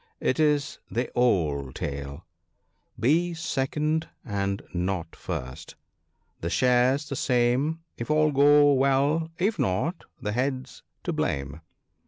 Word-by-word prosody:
It 130 - 0
is 150 -2 +1
the 120 +2 -2
old 75 - +1
tale! 70 0 -5 0.4
" - - -28
Be 170 +4 +2
second 155 0 -1 0.2
and 100 -3 -2
not 90 -2 -2
first! 65 0 -6 0.3
— - - -44
the 85 - -2
share's 130 - +3
the 140 - -4
same 130 +6 +1 0.2
If 120 - -5
all 155 0 +3
go 145 +1 +6
well. 140 +4 +2
If 205 +5 0
not, 130 - -1
the 105 - -3
Head's 130 +3 -2 0.2
to - - -2
blame." 70 +3 -2
130 Hz, 130 wpm, -26 LUFS, 95-150 Hz, 0.4 s, go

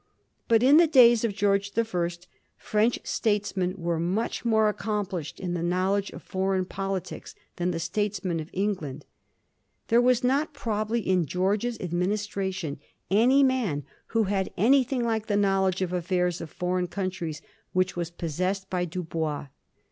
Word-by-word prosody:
But 230 0 +4
in 280 +4 +7
the 335 0 +6
days 240 -6 +6
of 220 -4 0
George 200 -1 +1
the 230 +1 +1
First, 175 -3 -3 0.3
French 215 +3 +1
statesmen 200 -4 0
were 170 -2 -1
much 185 +7 -1
more 220 -2 +3
accomplished 200 -7 -3
in 180 -2 -3
the 175 - -2
knowledge 185 +3 0
of - - -11
foreign 190 -1 -1
politics 195 0 -5 0.2
than 175 +1 0
the 170 -2 -2
statesmen 185 0 -1
of 155 +1 -6
England. 180 -8 -3 0.8
There 235 +1 +5
was 250 0 +3
not, 275 +5 +1
probably, 220 +1 -1
in 185 -5 +1
George's 200 - 0
administration 185 -3 -2 0.3
any 250 +7 +5
man 235 - +1 0.2
who 225 -1 +1
had 195 -1 -1
anything 255 +3 +3
like 225 -2 -1
the 205 -2 +1
knowledge 190 -2 +2
of 180 - -3
the 180 - 0
affairs 180 0 0
of 165 - -6
foreign 180 +2 -1
countries 180 -5 -4 0.3
which 185 0 +1
was 170 -1 -3
possessed 185 +4 -3
by 180 -1 0
Dubois. 160 -4 -3
190 Hz, 155 wpm, -27 LUFS, 180-220 Hz, 0.8 s, in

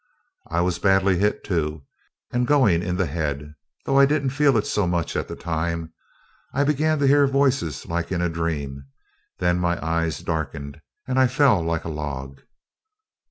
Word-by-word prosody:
I 85 +1 +1
was 90 -1 0
badly 95 0 +3
hit 105 +1 0
too, 75 -6 -2 0.5
and 120 0 +1
going 120 - +4
in 90 0 -2
the 95 - +1
head, 75 -2 -3 0.3
though 135 0 +3
I 140 - +7
didn't 140 -2 0
feel 140 -2 +3
it 105 - 0
so 105 -3 0
much 85 -2 -1
at - - -2
the - - -6
time. 85 0 -3 0.6
I 140 - +3
began 150 +2 +1
to 140 - +1
hear 140 0 +5
voices 135 - 0
like 85 +1 -3
in 90 - 0
a 90 - +1
dream; 75 -5 -3 0.5
then 90 -1 +1
my 85 -1 0
eyes 85 0 0
darkened, 75 -2 -4 0.3
and 130 0 +1
I 130 - +5
fell 125 - +3
like 80 0 -2
a - - -3
log. 70 -3 -6
85 Hz, 175 wpm, -23 LUFS, 80-130 Hz, 0.6 s, I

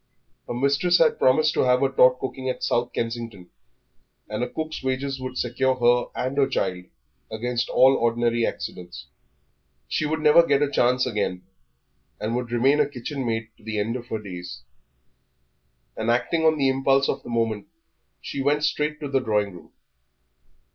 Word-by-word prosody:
Her - - -4
mistress 140 +8 +2
had 160 -2 +3
promised 155 +4 +3
to - - -2
have 125 0 +3
her 135 - +3
taught 125 -1 +5
cooking 130 0 -4
at 130 - -4
South 120 0 0
Kensington, 115 -5 -5 0.8
and - - -3
a - - -3
cook's 155 0 -5
wages 135 +1 -2
would 130 0 -5
secure 130 +2 0
her 120 0 +3
and 130 +2 -2
her 135 - +4
child 90 -8 -2 0.5
against 120 +2 -2
all 135 +1 +5
ordinary 120 0 +1
accidents. 90 -8 -5 0.8
She 155 - -1
would 155 +1 -1
never 155 +2 +6
get 145 -3 +2
such 145 - +2
a - - -13
chance 125 -1 +2
again, 105 -6 -2 0.8
and 110 +2 -2
would 125 -1 -3
remain 135 +5 +3
a - - +2
kitchen 135 +1 -5
maid 115 -1 -2
to - - -23
the 110 0 -4
end 110 +3 -1
of 120 -1 -7
her 110 - -3
days. 90 -10 -8 1.3
And 110 - -2
acting 160 +7 +1
on 160 -1 +4
the 140 -2 +2
impulse 135 +1 +2
of - - -2
the - - -11
moment 115 -3 -1 0.5
she 140 - -5
went 145 +2 +1
straight 150 +1 -1
to 145 - -3
the 135 -1 +1
drawing 105 -5 0
room. 90 - -14
125 Hz, 175 wpm, -24 LUFS, 115-140 Hz, 1.3 s, never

